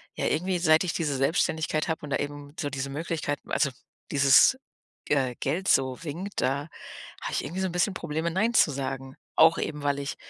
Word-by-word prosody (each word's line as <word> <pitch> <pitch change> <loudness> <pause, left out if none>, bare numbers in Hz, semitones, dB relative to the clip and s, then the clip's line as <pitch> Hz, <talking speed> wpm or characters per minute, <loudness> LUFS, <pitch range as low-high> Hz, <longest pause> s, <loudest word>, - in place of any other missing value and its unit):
ja, - - -2
irgendwie 180 +2 0
seit 160 -1 +4
ich 170 - -1
diese 150 -5 -1
Selbstständigkeit 155 +2 0
habe 160 - -2
und 145 - -7
da - - +2
eben 145 0 -6
so 145 - -1
diese 135 0 -4
Möglichkeit 150 0 -3
also, 140 -3 +1 0.4
dieses, 140 - +6 0.5
äh, 130 -4 +1
Geld 175 +8 -2
so 130 -1 +2
winkt, 170 +6 -4
da 140 +4 -1 0.5
habe - - -4
ich - - -1
irgendwie 175 +7 -4
so 190 - +1
'n 175 - -6
bisschen 180 +3 +1
Probleme 165 -1 -2
„Nein“ 215 +7 +1
zu 155 - +5
sagen. 135 0 -5 0.2
Auch 165 +1 +6
eben, 150 -1 -3
weil 140 0 +1
ich 140 0 -4
150 Hz, 200 wpm, -27 LUFS, 140-170 Hz, 0.5 s, dieses